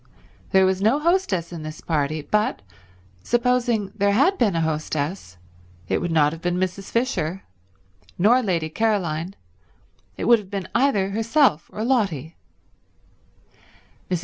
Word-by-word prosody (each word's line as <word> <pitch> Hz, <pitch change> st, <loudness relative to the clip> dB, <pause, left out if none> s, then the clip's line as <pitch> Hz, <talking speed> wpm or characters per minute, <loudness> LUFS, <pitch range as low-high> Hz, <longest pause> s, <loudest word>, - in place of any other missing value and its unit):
There 190 Hz, 0 st, +4 dB
was 190 Hz, 0 st, 0 dB
no 220 Hz, +7 st, +3 dB
hostess 300 Hz, -, 0 dB
in 165 Hz, -, -6 dB
this 155 Hz, +1 st, -7 dB
party, 155 Hz, -1 st, -1 dB
but 210 Hz, -, 0 dB, 0.6 s
supposing 240 Hz, -, +1 dB
there 200 Hz, -1 st, +2 dB
had 280 Hz, -, +3 dB
been 210 Hz, -7 st, +2 dB
a 165 Hz, -, +1 dB
hostess 155 Hz, -, -3 dB, 0.5 s
it -, -, 0 dB
would 175 Hz, -, -2 dB
not 150 Hz, -2 st, +3 dB
have 165 Hz, -, -9 dB
been 175 Hz, +1 st, -1 dB
Mrs. 185 Hz, +1 st, -3 dB
Fisher, 195 Hz, -, -1 dB, 0.7 s
nor 230 Hz, +8 st, +4 dB
Lady 175 Hz, -8 st, -1 dB
Caroline, 185 Hz, -4 st, -1 dB, 0.8 s
it -, -, -3 dB
would 235 Hz, -1 st, +6 dB
have 200 Hz, -3 st, -12 dB
been 195 Hz, -2 st, -4 dB
either 215 Hz, -7 st, +2 dB
herself 225 Hz, -, +2 dB
or 215 Hz, -, -4 dB
Lotty. 195 Hz, -, 0 dB, 1.7 s
Mrs. 180 Hz, -2 st, 0 dB
190 Hz, 140 wpm, -23 LUFS, 165-230 Hz, 1.7 s, would